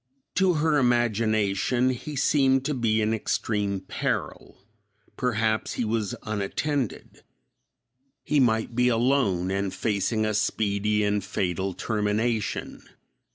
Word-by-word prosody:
To 185 -1 +3
her 155 -1 +2
imagination 115 0 +1
he 130 +4 -6
seemed 135 -1 +3
to 150 - 0
be 110 -4 +1
in 110 +1 +1
extreme 105 -3 -1
peril; 95 - -4 0.6
perhaps 110 -3 0
he 120 - -2
was 110 -2 -1
unattended; 110 +5 -3 1.0
he 150 - +1
might 110 -2 +2
be 125 +1 +2
alone 115 -7 +2
and 100 0 -1
facing 110 +1 0
a 110 - 0
speedy 105 0 0
and 105 -1 0
fatal 95 -1 -2
termination. 110 0 -1
110 Hz, 110 wpm, -26 LUFS, 105-125 Hz, 1.0 s, To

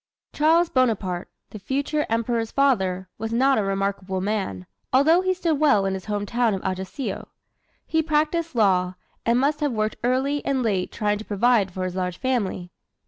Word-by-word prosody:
Charles 325 +3 +4
Bonaparte, 205 -8 0 0.2
the 215 - -8
future 285 +7 -1
Emperor's 230 0 0
father, 190 -10 +1
was 225 0 -3
not 265 +2 +3
a - - +1
remarkable 195 -1 -2
man, 190 - -2 0.3
although 310 +7 +5
he 375 0 +1
stood 335 -5 0
well 280 -10 +4
in 195 - 0
his 190 -1 -5
home 205 -1 -2
town 230 -1 +1
of 190 - -6
Ajaccio. 190 +7 -4 0.6
He 320 - +1
practised 315 0 0
law, 185 -4 +2 0.3
and 235 +1 +4
must 290 +3 +1
have 290 -4 0
worked 215 -1 -1
early 265 +4 +1
and 265 -2 0
late 195 -5 0
trying 210 -1 -1
to - - -6
provide 210 -1 +2
for 185 +1 -4
his 185 -1 -3
large 180 -1 -3
family. 205 -9 -2
225 Hz, 175 wpm, -24 LUFS, 190-275 Hz, 0.6 s, although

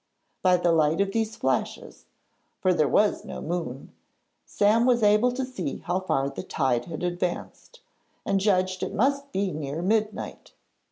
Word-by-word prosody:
By 180 -1 +4
the 175 -1 +2
light 160 0 +2
of 200 0 +1
these 220 0 -1
flashes 130 - -3 0.5
for 185 - +3
there 155 -4 +2
was 210 0 +2
no - - -7
moon 160 -6 -4 0.6
Sam 220 +4 +3
was 240 -3 +3
able 210 +4 +4
to 260 +1 -2
see 190 - -4
how 180 +1 0
far 140 -7 0
the - - -6
tide 125 -4 0
had 165 0 -6
advanced, 180 - -4 0.4
and 195 -1 +1
judged 185 -2 +1
it - - -3
must 280 +4 +1
be 195 -3 -1
near 150 +2 -4
midnight. 215 +2 -2
185 Hz, 160 wpm, -26 LUFS, 165-215 Hz, 0.6 s, By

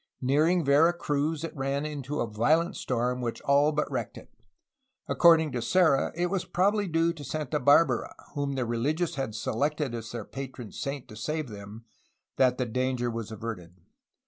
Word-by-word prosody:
Nearing 155 +6 +2
Vera 150 +5 +5
Cruz 150 -1 -1
it 165 - -5
ran 140 +1 -1
into 150 -1 -4
a - - -1
violent 155 - +1
storm 125 0 -1
which 120 -2 -3
all 140 +2 +3
but 150 0 0
wrecked - - -3
it. - - -14 0.7
According 165 -3 +5
to 125 -2 -2
Serra 155 +2 +3
it 175 +1 -1
was 195 -2 0
probably 205 +3 +1
due 165 0 +1
to 155 -3 -10
Santa 150 0 -2
Barbara, 140 -1 +3 0.2
whom 140 -1 -2
the 130 -2 -1
religious 145 +9 -1
had 135 -6 -3
selected 145 +4 -1
as 115 -1 -6
their 115 -3 -5
patron 130 -4 -7
saint 140 -2 -5
to 110 - -10
save 150 +5 -3
them, 105 +2 -10 0.5
that 125 -1 +3
the 125 - 0
danger 125 0 -1
was 115 -2 -5
averted. 105 -6 -7
140 Hz, 170 wpm, -28 LUFS, 120-155 Hz, 0.7 s, Vera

